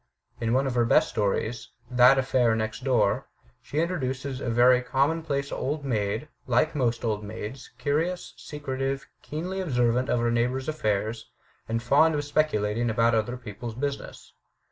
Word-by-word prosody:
In 115 0 0
one 135 +2 +3
of 135 - -1
her 120 -1 +3
best 155 +7 +4
stories, 110 +3 -1 0.2
'That 125 +2 +6
Affair 125 -3 +2
Next 110 +1 -3
Door,' 115 -7 +2 0.3
she 145 - -7
introduces 135 -6 -2
us - - -4
to - - -3
a - - +1
very 125 +2 +5
com 135 +4 +2
monplace 140 -3 -2
old 145 +1 -2
maid, 110 +1 -1 0.2
like 130 +6 +2
most 120 -5 0
old 105 -2 -1
maids 105 +4 -7
curious, 165 +5 -1
secretive, 135 -2 -4 0.2
keenly 180 +6 -4
observant 125 -5 +1
of 120 - +2
her 120 0 +1
neighbours' 125 +3 0
affairs, 110 -6 -1 0.4
and 115 +1 -1
fond 150 +6 +4
of 145 - -1
speculating 120 -7 +1
about 115 +1 +3
other 115 +3 0
people's 115 0 -7
business. 140 +2 -5
125 Hz, 165 wpm, -26 LUFS, 115-140 Hz, 0.4 s, That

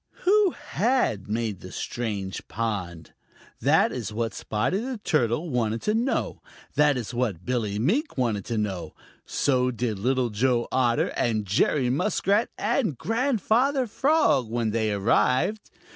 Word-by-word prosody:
Who 405 +1 +5
had 240 - 0
made 110 -3 -2
the 90 - -10
strange 105 -5 -4
pond? 95 -8 -4 0.5
That - - +3
is - - -4
what 115 +1 -2
Spotty 110 - -1
the 250 +2 -4
Turtle 155 - 0
wanted 115 -2 -1
to 210 - +1
know. 235 +4 -1 0.3
That 150 -2 +3
is 120 -1 -5
what 110 -8 -2
Billy 110 -5 -1
Mink 210 - 0
wanted 115 -6 0
to 115 - -3
know. 100 -5 -3 0.3
So 130 -2 +1
did 115 -4 -2
Little 125 +1 +1
Joe 120 +2 +1
Otter 120 -2 +2
and 110 -3 -1
Jerry 125 +6 +2
Muskrat 200 - +1
and 215 - 0
Grandfather 250 - +1
Frog, 265 - +2
when 115 -1 -1
they 110 -1 0
arrived. 125 - +1
125 Hz, 140 wpm, -25 LUFS, -, 0.5 s, Who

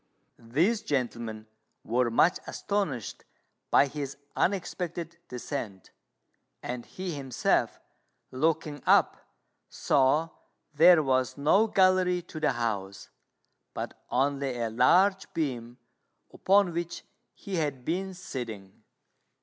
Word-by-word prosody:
These 185 - +2
gentlemen 120 - -3 0.4
were 120 +1 +1
much 165 +10 +3
astonished 195 - -3 0.5
by - - +5
his 140 -1 -6 0.2
unexpected 170 -3 -2
descent; 120 - -6 0.7
and 120 -1 -5
he 185 -2 -5
himself, 135 -4 0 0.5
looking 150 +1 -1
up, - - +4 0.5
saw 145 +4 +2 0.4
there 165 +1 +7
was 130 -1 0
no 160 +10 +4
gallery 185 -3 +3
to 155 - -9
the 150 -3 +1
house, 100 -5 -4 0.6
but - - -6
only 135 0 0
a 115 -1 -2
large 185 - +3
beam 125 -6 -3 0.6
upon 195 -2 +3
which 170 0 -4 0.3
he 200 -4 -5
had 145 -6 -2
been 190 +3 -2
sitting. 115 - -7
145 Hz, 100 wpm, -28 LUFS, 125-180 Hz, 0.7 s, there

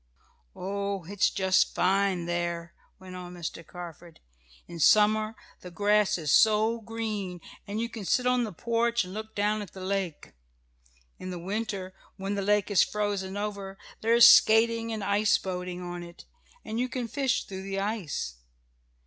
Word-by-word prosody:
"Oh, 200 0 -3
it's 195 +4 +1
just 190 -1 +2
fine 190 -1 +2
there!" 170 0 -3 0.2
went 185 -1 -11
on 180 0 -8
Mr. 170 -1 -6
Carford. 175 -1 -10 0.5
"In 170 -1 -9
summer 215 +5 +4 0.2
the 180 - -10
grass 205 +2 +2
is 155 -5 0
so 220 +1 +4
green, 210 -5 -4 0.3
and 205 +2 -3
you 230 - -1
can 230 -2 -8
sit 250 +6 +1
on 250 -1 +3
the 220 - -4
porch 235 +4 0
and 180 0 -9
look 220 +1 -7
down 210 +1 +1
at 200 - -9
the 190 - -10
lake. 190 -5 -3 0.9
In 185 - -6
the 180 - -5
winter, 195 0 -4 0.2
when 195 +1 -3
the 200 - -1
lake 205 +1 +1
is 200 - +6
frozen 205 -2 -2
over, 200 -2 -5 0.2
there 230 +1 +3
is 235 0 +10
skating 230 0 +5
and 215 -2 -3
ice 205 +1 +3
boating 180 -1 -5
on 175 0 -6
it, 170 0 -12 0.4
and 220 +2 -3
you 255 +1 0
can 245 -1 -3
fish 265 +1 0
through 190 -1 -7
the 195 0 -4
ice. 195 - -3
200 Hz, 165 wpm, -28 LUFS, 180-220 Hz, 0.9 s, is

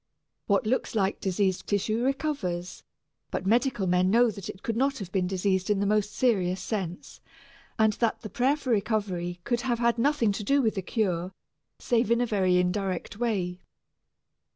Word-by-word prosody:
What 255 - +2
looks 240 +1 -1
like 195 -2 +1
diseased 190 0 0
tissue 215 +3 0
recovers, 255 - -2 0.5
but - - -3
medical 235 0 +2
men 180 0 +2
know 235 +3 +4
that 200 -2 -8
it 190 - -9
could 230 - -2
not 270 +3 +1
have 190 -4 -7
been 185 -2 0
diseased 190 0 0
in 205 -2 +2
the 200 - +1
most 210 0 +1
serious 190 -7 +1
sense, 185 -5 -5 0.6
and 220 -1 +4
that 230 +1 -1
the 215 - -7
prayer 265 +7 +2
for 260 -4 -3
recovery 195 -5 -1
could 240 +3 0
have 240 -2 0
had 235 0 +1
nothing 245 -4 +2
to 205 +2 -4
do 280 +7 +3
with 225 -5 +2
the 195 - -3
cure, 185 -3 -1 0.4
save 235 -2 +1
in 235 0 +3
a 245 - +2
very 190 -5 +2
indirect 185 +1 -1
way. 185 -7 -1
210 Hz, 175 wpm, -27 LUFS, 185-235 Hz, 0.6 s, know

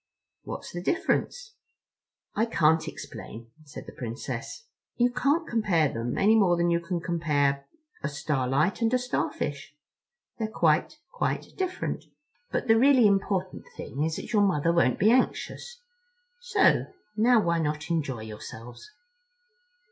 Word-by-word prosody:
"What's - - -7
the 175 - -4
difference?" 455 - -1 0.8
"I 225 +2 +1
can't 160 -6 +2
explain," 115 +1 -9
said 145 - -10
the - - -9
Princess. 120 - -6 0.3
"You 245 0 +2
can't 290 +6 +1
compare 195 -10 +2
them 115 +2 -3
any 210 +3 +4
more 185 -5 +4
than 170 0 +2
you 170 - +2
can 170 +1 -3
compare 145 -5 0 0.3
a - - -2
starlight 140 - 0
and 225 0 +2
a - - +5
starfish. 150 - -3 0.6
They're 220 - -1
quite, 165 - +1
quite - - -3
different. 370 -1 -3 0.5
But - - -2
the 225 0 +5
really 260 -2 +6
important 195 -2 0
thing 140 - -6
is 160 0 -1
that - - -7
your 210 - +4
Mother 170 -4 +2
won't 125 -7 +3
be 215 +4 +4
anxious. 485 - -1 0.6
So 485 - +3 0.3
now 235 +2 +5
why 170 -4 +1
not 150 0 -2
enjoy 140 -9 -2
yourselves?" 110 - -10
170 Hz, 140 wpm, -27 LUFS, 145-225 Hz, 0.8 s, really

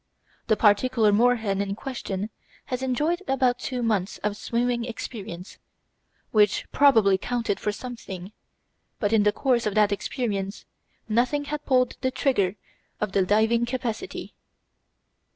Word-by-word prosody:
The 220 - +4
particular 220 +1 +4
moorhen 220 -3 +2
in 200 0 -2
question 215 -5 -4 0.3
had 255 -2 -3
enjoyed 300 +8 0
about 255 -2 +2
two 250 -2 -3
months 210 -4 0
of 210 0 0
swimming 235 +2 -1
experience, 210 -6 -7 0.7
which 210 -2 +3
probably 225 -9 +5
counted 235 -2 -1
for 210 - -1
something, 205 -5 -8 0.7
but 210 0 0
in 220 - +5
the 210 0 +4
course 240 0 +1
of 210 - -2
that 210 -1 +4
experience 200 -1 -3 0.4
nothing 245 +6 +1
had 295 +1 -5
pulled 255 -2 +2
the 260 - +1
trigger 210 -8 +1 0.4
of 210 -2 -1
the 195 -1 +3
diving 220 +4 +3
capacity. 250 - -4
225 Hz, 135 wpm, -25 LUFS, 205-250 Hz, 0.7 s, probably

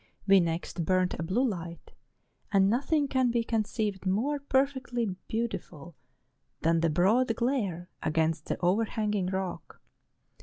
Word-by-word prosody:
We 195 -1 +6
next 170 0 -2
burnt 185 +2 +1
a - - -1
blue 200 +11 +1
light; 170 -5 -6 0.6
and 195 -1 +4
nothing 285 +4 +1
can 260 -2 +2
be 235 0 +1
conceived 215 -3 -1
more 250 +10 +1
perfectly 265 -3 0 0.2
beautiful 175 -8 -4 0.7
than 165 +1 +3
the 165 0 +2
broad 220 +9 +3
glare 215 -9 -1
against 160 -1 0
the - - -1
overhanging 210 +1 +1
rock. 190 -1 -4
200 Hz, 125 wpm, -29 LUFS, 175-240 Hz, 0.7 s, We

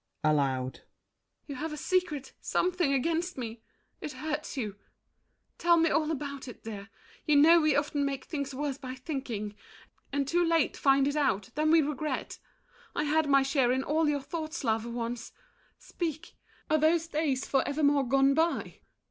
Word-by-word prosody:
[Aloud.] 135 -4 +1 0.6
You 285 - -6
have 320 +3 -3
a 300 - -5
secret, 320 -4 -1
something 360 -5 +1
against 330 +6 0
me! 230 -2 -6 0.4
It 300 - -5
hurts 300 -2 -4
you! 210 -5 -3 0.8
Tell 340 0 +5
me 330 -1 +3
all 310 -1 +1
about 280 -3 -4
it, 245 - -10
dear. 205 -2 -7 0.4
You 300 - +4
know 325 +4 +7
we 305 -2 +3
often 290 0 0
make 275 -1 -2
things 280 -3 -4
worse 280 -1 -3
by 255 -1 -6
thinking, 250 -7 -4 0.6
And 280 -1 0
too 350 +4 +2
late 330 -2 +2
find 275 0 +3
it 285 - -1
out; 210 -10 0
then 305 +1 +1
we 325 0 +6
regret. 300 +1 -3 0.6
I - - +1
had 305 0 +1
my 275 -1 +5
share 270 -3 +2
in 260 +1 +1
all 310 +2 +1
your 285 -2 -1
thoughts, 315 +1 -5
love, 225 -1 0
once! 235 0 -4 0.4
Speak, 330 -1 -5 0.3
are 310 - +2
those 320 +2 +3
days 300 -5 -1
for 270 - +2
evermore 285 -2 +2
gone 275 +2 +4
by? 325 +3 0
285 Hz, 165 wpm, -29 LUFS, 260-315 Hz, 0.8 s, know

